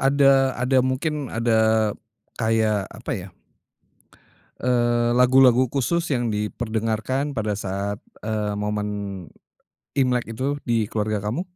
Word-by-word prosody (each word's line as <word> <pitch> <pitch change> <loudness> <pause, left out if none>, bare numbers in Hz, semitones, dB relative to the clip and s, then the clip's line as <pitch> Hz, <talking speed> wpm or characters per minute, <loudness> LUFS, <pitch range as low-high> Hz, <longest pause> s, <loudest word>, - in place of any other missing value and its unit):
ada 135 0 +5 0.2
ada 125 +2 +1
mungkin 135 +2 -1
ada 110 -2 +2 0.5
kayak 110 -3 +1
apa - - -6
ya? - - -5 1.3
Eee, 120 -1 +2
lagu-lagu 125 0 +6
khusus 140 +7 -1
yang 120 -2 0
diperdengarkan 110 +5 -2
pada 105 -4 -2
saat, 100 +1 -3 0.2
eee, 105 -1 -2
momen 105 0 -2 1.1
Imlek 125 -3 +1
itu 130 +5 -2
di 115 -3 0
keluarga 105 0 -1
kamu? 105 - -2
115 Hz, 110 wpm, -23 LUFS, 105-130 Hz, 1.3 s, lagu-lagu